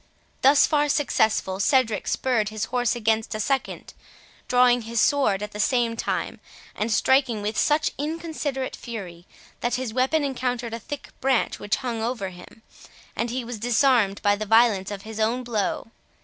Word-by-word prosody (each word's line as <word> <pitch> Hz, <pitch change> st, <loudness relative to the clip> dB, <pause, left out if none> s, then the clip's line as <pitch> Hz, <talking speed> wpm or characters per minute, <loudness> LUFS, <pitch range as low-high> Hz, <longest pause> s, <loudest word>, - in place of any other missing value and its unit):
Thus 275 Hz, +2 st, +6 dB
far 295 Hz, -1 st, +1 dB
successful, 220 Hz, -9 st, +1 dB
Cedric 225 Hz, -1 st, +2 dB
spurred 235 Hz, -5 st, 0 dB
his 215 Hz, 0 st, -3 dB
horse 245 Hz, 0 st, 0 dB
against 220 Hz, -1 st, 0 dB
a -, -, -4 dB
second, 270 Hz, +5 st, -2 dB, 0.5 s
drawing 245 Hz, -1 st, +4 dB
his 230 Hz, 0 st, -3 dB
sword 215 Hz, -6 st, +2 dB
at 210 Hz, -, -6 dB
the 210 Hz, -, -8 dB
same 235 Hz, +1 st, +1 dB
time, -, -, -3 dB, 0.4 s
and 220 Hz, +2 st, -2 dB
striking 255 Hz, -3 st, +2 dB
with 210 Hz, +1 st, -2 dB
such 300 Hz, +5 st, +2 dB
inconsiderate 305 Hz, -3 st, -3 dB
fury, 185 Hz, -7 st, -8 dB, 0.3 s
that 240 Hz, -, -1 dB
his 250 Hz, -3 st, -4 dB
weapon 265 Hz, +5 st, +1 dB
encountered 250 Hz, -4 st, -2 dB
a 230 Hz, -, -4 dB
thick 290 Hz, +6 st, -7 dB
branch 265 Hz, -2 st, +1 dB
which 205 Hz, -, 0 dB
hung 230 Hz, -3 st, -2 dB
over 225 Hz, -4 st, -2 dB
him, 185 Hz, +5 st, -14 dB, 0.5 s
and 235 Hz, -, -1 dB
he 250 Hz, +1 st, -3 dB
was 235 Hz, -2 st, -6 dB
disarmed 235 Hz, -3 st, +2 dB
by 205 Hz, 0 st, +4 dB
the 215 Hz, +1 st, -5 dB
violence 225 Hz, -3 st, +4 dB
of 200 Hz, -1 st, -6 dB
his 220 Hz, 0 st, -8 dB
own 230 Hz, +4 st, 0 dB
blow. 225 Hz, -1 st, -2 dB
235 Hz, 165 wpm, -24 LUFS, 215-260 Hz, 0.5 s, Thus